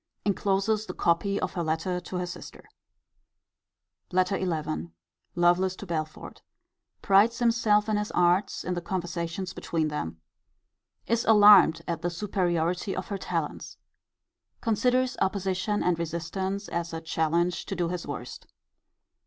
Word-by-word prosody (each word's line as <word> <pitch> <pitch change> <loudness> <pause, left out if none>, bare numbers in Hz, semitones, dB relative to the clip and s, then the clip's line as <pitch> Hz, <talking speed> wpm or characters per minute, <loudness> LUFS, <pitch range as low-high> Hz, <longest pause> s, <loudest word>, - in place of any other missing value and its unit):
Encloses 205 +2 +1
the - - -6
copy 200 +4 +1
of - - -3
her 175 - -2
letter 165 +3 -1
to 180 +1 -8
her 180 0 -1
sister. 175 - -10 1.5
LETTER 185 +1 +1
XI. 155 - -2 0.5
Lovelace 175 +2 +3
to 200 - -9
Belford. 155 -3 -5 0.6
Prides 210 +4 +4
himself 230 -3 +3
in 215 -1 +1
his 210 0 -2
arts 180 +3 +2
in 180 - -2
the 175 - -3
conversations 175 +1 -4
between 160 -2 -2
them. 80 - -4 0.9
Is 230 +1 +1
alarmed 205 -6 +7
at 170 -1 -2
the 175 - 0
superiority 175 0 -1
of 185 - -5
her 200 -2 -3
talents. - - -4 0.8
Considers 250 +3 +1
opposition 190 +1 0
and 175 -2 +1
resistance 185 +4 -3
as 170 0 -3
a 165 - -4
challenge 165 +2 0
to 195 - -3
do 175 -2 -1
his 180 -1 -4
worst. 125 -4 -7
180 Hz, 135 wpm, -27 LUFS, 170-200 Hz, 1.5 s, alarmed